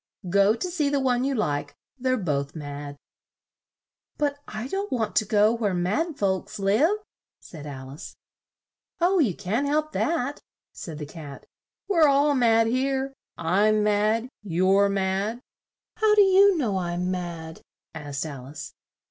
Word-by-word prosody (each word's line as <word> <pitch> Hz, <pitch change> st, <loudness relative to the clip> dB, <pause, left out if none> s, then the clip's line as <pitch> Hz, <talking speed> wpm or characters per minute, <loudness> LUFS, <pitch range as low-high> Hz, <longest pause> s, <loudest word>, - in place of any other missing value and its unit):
Go 200 Hz, +3 st, +4 dB
to 355 Hz, +10 st, -4 dB
see 305 Hz, -5 st, 0 dB
the 285 Hz, 0 st, +1 dB
one 250 Hz, -2 st, +1 dB
you 275 Hz, 0 st, 0 dB
like; 145 Hz, -, -2 dB, 0.2 s
they're 255 Hz, -1 st, 0 dB
both 140 Hz, -, -2 dB
mad." 145 Hz, -1 st, -7 dB, 1.2 s
"But 285 Hz, -1 st, -1 dB
I 220 Hz, +3 st, -5 dB
don't 390 Hz, +7 st, -3 dB
want 225 Hz, -4 st, -1 dB
to 215 Hz, -, +3 dB
go 210 Hz, +1 st, +3 dB
where 210 Hz, -5 st, -1 dB
mad 280 Hz, -, -1 dB
folks 190 Hz, -2 st, -1 dB
live," 215 Hz, -, +2 dB, 0.4 s
said 150 Hz, -3 st, -11 dB
Al 130 Hz, -2 st, -8 dB
ice. 145 Hz, -, -10 dB, 0.8 s
"Oh, 360 Hz, +2 st, +3 dB
you 225 Hz, -, +2 dB
can't 215 Hz, +8 st, -1 dB
help 305 Hz, +1 st, 0 dB
that," 290 Hz, -4 st, -1 dB, 0.3 s
said 160 Hz, -4 st, -8 dB
the 150 Hz, -, -5 dB
Cat, 145 Hz, -2 st, -10 dB, 0.4 s
"we're 335 Hz, -6 st, +4 dB
all 285 Hz, +1 st, +4 dB
mad 230 Hz, -3 st, +4 dB
here. 265 Hz, +3 st, 0 dB, 0.2 s
I'm 205 Hz, +6 st, +2 dB
mad. 210 Hz, +3 st, +1 dB
You're 195 Hz, +1 st, +3 dB
mad." 195 Hz, +3 st, -1 dB, 0.6 s
"How 430 Hz, -1 st, +4 dB
do 415 Hz, -, +7 dB
you 390 Hz, 0 st, +5 dB
know 220 Hz, -10 st, 0 dB
I'm 175 Hz, +1 st, -2 dB
mad!" 170 Hz, -3 st, -5 dB, 0.3 s
asked 145 Hz, -2 st, -5 dB
Al 135 Hz, -5 st, -8 dB
ice. 145 Hz, +3 st, -9 dB
210 Hz, 150 wpm, -25 LUFS, 175-275 Hz, 1.2 s, do